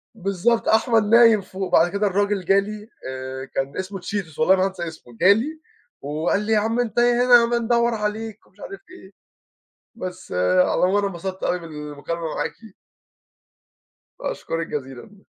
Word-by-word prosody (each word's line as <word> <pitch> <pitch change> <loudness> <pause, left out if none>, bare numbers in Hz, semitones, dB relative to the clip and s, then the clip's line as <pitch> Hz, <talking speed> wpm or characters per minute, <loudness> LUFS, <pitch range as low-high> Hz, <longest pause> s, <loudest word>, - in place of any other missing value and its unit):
بالضبط 200 +3 0
أحمد 225 0 +3
نايم 230 0 +6
فوق. 190 0 -6
بعد 175 +2 +4
كده 200 +1 0
الراجل 200 -1 0
جا 195 +2 +4
لي، 210 +2 -6 0.2
آآ 130 0 -6
كان 135 +1 -3
اسمه 190 +1 -4
اتشيتوس 175 -5 -5
والله 185 +5 +5
ما 185 0 +1
هانسى 190 -3 -4
اسمه. 120 -7 -12
جا 195 +3 +7
لي، 305 +9 -4 0.4
وقال 155 +7 -1
لي: 225 - +1
"يا 215 - +4
عم 225 +3 -1
أنت 240 -1 -2
يا 240 0 +3
هنا 240 -2 +7
بندوّر 235 0 +1
عليك، 215 0 -4
ومش 195 - -29
عارف 390 - -9
إيه. 205 - -14 0.8
بس 185 -3 -8
على 90 - +2
العموم 185 +3 +2
أنا 205 -1 +1
انبسطت 190 +1 -6
أوي 180 - 0
من - - -11
المكالمة 150 +2 -6
معاكِ. - - -2 1.7
أشكُرِك 165 - -4
جزيلًا. 135 +8 -7
195 Hz, 165 wpm, -22 LUFS, 170-225 Hz, 1.7 s, جا